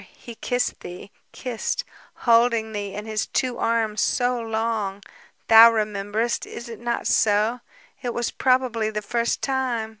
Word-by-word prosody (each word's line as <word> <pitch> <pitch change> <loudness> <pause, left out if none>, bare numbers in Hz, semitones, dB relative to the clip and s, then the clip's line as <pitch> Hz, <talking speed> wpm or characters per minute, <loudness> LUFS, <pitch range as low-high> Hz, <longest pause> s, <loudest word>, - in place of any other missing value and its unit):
he 235 - -10
kissed 245 +2 -2
thee... 180 +3 -10 0.2
kissed... 250 - -3 0.3
holding 230 -2 +3
thee 205 -2 -4
in 210 +1 -6
his 215 -1 -2
two 250 -2 -1
arms... 225 -2 0
so 245 -1 +1
long. 220 -3 -2 0.4
Thou 225 +1 +9
rememberest, 215 +1 -1
is 235 - -8
it 230 -2 -9
not 235 0 -2
so? 215 +3 +2 0.4
It 245 -3 -2
was 240 0 -2
probably 255 -4 +1
the 210 -1 -4
first 235 +3 -1
time 255 -5 -1
230 Hz, 145 wpm, -23 LUFS, 215-240 Hz, 0.4 s, Thou